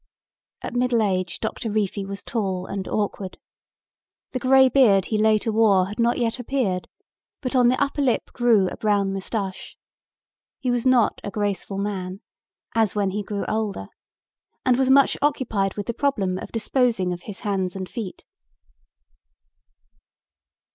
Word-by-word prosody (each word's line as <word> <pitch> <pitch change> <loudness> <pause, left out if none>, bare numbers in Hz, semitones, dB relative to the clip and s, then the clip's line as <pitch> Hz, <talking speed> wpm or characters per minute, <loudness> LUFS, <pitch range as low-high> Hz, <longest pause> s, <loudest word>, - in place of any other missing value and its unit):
At - - -5
middle 245 -2 +2
age 185 -3 -1
Doctor 220 +1 -3
Reefy 205 -1 -1
was 200 0 -6
tall 190 -5 -2
and 195 -1 -5
awkward. 200 -3 -3 0.9
The 255 - -2
grey 265 +1 +6
beard 225 -8 +4
he 215 - -1
later 215 +1 +3
wore 210 -4 +4
had 210 - -8
not 235 +1 +2
yet 235 0 -1
appeared, 235 -8 -1 0.5
but 260 0 -3
on 250 -1 +5
the 255 +2 +2
upper 285 +1 0
lip 260 -4 0
grew 230 -6 +3
a - - -8
brown 200 -2 +1
mustache. 195 0 -4 0.8
He 255 - -1
was 245 +1 0
not 250 -3 +3
a - - -3
graceful 200 -1 -2
man, 195 -1 -4 0.5
as 220 -3 +2
when 200 -2 +1
he 210 +2 -2
grew 205 0 -4
older, 210 - -2 0.8
and 255 - +4
was 260 +1 +1
much 275 +1 +5
occupied 225 -9 0
with 205 - -4
the 235 - -2
problem 205 -9 0
of - - -8
disposing 225 -5 +1
of 175 - -7
his 205 -3 -8
hands 190 -3 -1
and 190 -1 -4
feet. 215 -4 -7
215 Hz, 155 wpm, -23 LUFS, 195-245 Hz, 0.9 s, grey